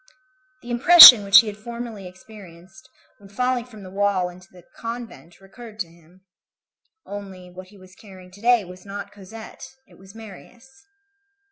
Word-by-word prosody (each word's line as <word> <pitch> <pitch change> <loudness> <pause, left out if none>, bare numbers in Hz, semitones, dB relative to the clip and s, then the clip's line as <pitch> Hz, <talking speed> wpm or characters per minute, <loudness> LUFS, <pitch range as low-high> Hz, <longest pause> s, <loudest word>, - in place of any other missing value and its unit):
The 240 - -10
impression 250 -3 +8
which 200 +2 +5
he - - -13
had 210 -1 -9
formerly 230 -3 -10
experienced 190 +2 -18 0.3
when 200 -1 -19
falling 250 +3 -4
from 220 -5 -16
the 185 - -13
wall 195 -2 -2
into 180 +1 -18
the 180 -1 -19
convent 230 -7 -11
recurred 215 +3 -16
to 170 - -7
him. 170 +2 -25 0.8
Only, 190 -3 -12
what 185 +1 -14
he 205 +2 -21
was 185 -1 -20
carrying 185 -3 -18
to 200 +2 -19
day 240 -3 +1
was 180 +1 -15
not 200 0 -10
Cosette; 220 +6 -14
it - - -23
was 190 +2 -19
Marius. 240 - -17
200 Hz, 160 wpm, -20 LUFS, 185-230 Hz, 0.8 s, impression